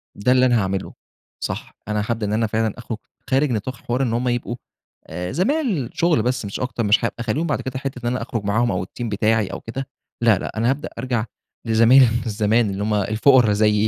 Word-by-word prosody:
ده 105 +5 +1
اللي 130 0 +5
أنا 120 -2 +3
هاعمله، 95 0 -3 0.5
صح. - - -5
أنا 105 -1 0
هابدأ 115 -2 -1
إن 105 - -1
أنا 110 +1 +1
فعلًا 110 0 0
أخرج 115 -1 -5 0.3
خارج 135 +1 +2
نطاق 120 +3 -2
حوار 120 +3 -2
إن 120 -3 0
هُم 120 +2 0
يبقوا، 120 -1 -1 0.5
آآ 90 +3 -5
زمايل 200 - 0
شغل 165 -8 +2
بس 125 -2 -1
مش 100 - -5
أكتر، 125 -2 -2
مش 105 +3 +3
هابقى - - -2
أخلّيهم 120 +9 -1
بعد 145 - -1
كده 130 -1 -4
حتّة 135 -1 -5
إن - - -1
أنا 125 - -2
أخرج 115 -2 -3
معاهم 115 +4 +2
أو 90 0 -2
الteam 120 - -8
بتاعي 110 0 +1
أو - - -6
كده، 130 +4 -5 0.3
لا، 115 -4 +5
لا - - -6
أنا 115 +2 +2
هابدأ 140 +3 -1
أرجع 120 -2 -1 0.4
لزمايل 115 +3 +6 0.2
زمان 110 +1 +2
اللي 100 +1 -3
هم 105 +1 0
الفقرا 110 +3 +4
زيي، 105 0 +3
115 Hz, 210 wpm, -21 LUFS, 105-130 Hz, 0.5 s, لزمايل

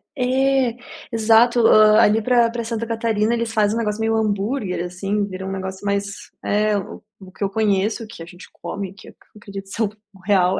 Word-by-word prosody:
É 265 0 +2
é, - - -14 0.4
exato. 230 +1 +4
Hã, 215 0 +6
ali 215 +2 +4
para 240 0 +3
para 235 0 -4
Santa 230 0 -4
Catarina 225 -1 0
eles 235 -1 -2
fazem 210 -1 +2
um - - -1
negócio 210 -1 -2
meio 225 0 +1
hambúrguer, 205 -2 -1
assim, 195 +3 -2
vira 190 -1 -7
um 190 - -4
negócio 190 +1 -6
mais 200 0 -3
é, 210 0 +1
o 195 - -7 0.2
o 190 -2 -13
que 200 - -6
eu 195 - 0
conheço, 210 +2 0
que 215 -5 -12
a 165 - -8
gente 180 +2 -13
come, 195 -2 -6
que 190 - -16
eu - - -17 0.2
acredito 200 -2 -9
ser 225 - -5
o 210 - 0 0.2
o 195 - -18
real 190 -2 +3
210 Hz, 210 wpm, -21 LUFS, 195-230 Hz, 0.4 s, Hã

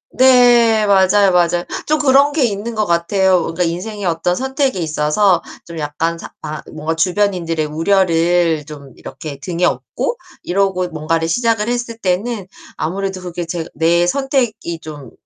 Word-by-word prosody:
네. 240 -4 +5
맞아요, 195 0 +4
맞아. 175 -1 +2 0.2
좀 310 - +2
그런 280 +1 +4
게 295 -2 +1
있는 220 +1 -3
것 215 -1 0
같아요. 180 +2 +2
뭔가 165 +2 -2
인생의 190 +5 -4
어떤 175 +1 0
선택이 265 0 -1
있어서 160 +4 +2 0.2
좀 170 -1 -8
약간 155 +3 -2
사 - - -10
아 155 0 -5
뭔가 155 +1 -3
주변인들의 175 -2 0
우려를 165 -1 +1
좀 140 -3 -11
이렇게 140 +1 -8
등에 170 +4 -4
업고 485 - -2 0.3
이러고 185 -1 0
뭔가를 165 0 -1
시작을 225 +4 0
했을 240 -1 -3
때는 200 +1 -2 0.3
아무래도 190 +3 -3
그게 175 -1 -5
제가 165 0 -5
내 170 +2 +2
선택이 250 - -1
좀 145 -6 -10
180 Hz, 305 characters per minute, -17 LUFS, 165-215 Hz, 0.3 s, 네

